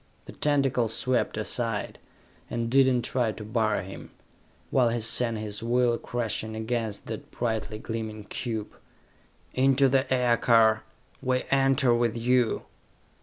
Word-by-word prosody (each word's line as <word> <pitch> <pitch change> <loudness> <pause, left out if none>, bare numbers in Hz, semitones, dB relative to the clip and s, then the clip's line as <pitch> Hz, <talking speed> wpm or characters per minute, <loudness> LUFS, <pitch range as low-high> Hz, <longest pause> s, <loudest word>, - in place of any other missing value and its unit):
The - - -9
tentacle 135 -5 +1
swept 120 +1 0
aside, 110 -1 -2 0.5
and 115 0 -2
did 135 0 +5
not 125 -1 +1
try 120 -4 0
to 105 - -8
bar 110 0 0
him, 95 +1 -9 0.6
while 125 -3 +4
he 120 +1 -1
sent 115 +1 0
his 105 0 -5
will 120 +1 +2
crashing 110 -2 -3
against 110 -2 -3
that 110 -1 -7
brightly 110 -2 -3
gleaming 110 -1 -5
cube. 110 0 -4 0.8
"Into 135 +1 +4
the 130 0 +1
aircar! 115 -3 +4 0.4
We 130 -1 0
enter 135 -2 +4
with 120 -1 +1
you!" 120 0 +1
120 Hz, 130 wpm, -27 LUFS, 110-125 Hz, 0.8 s, did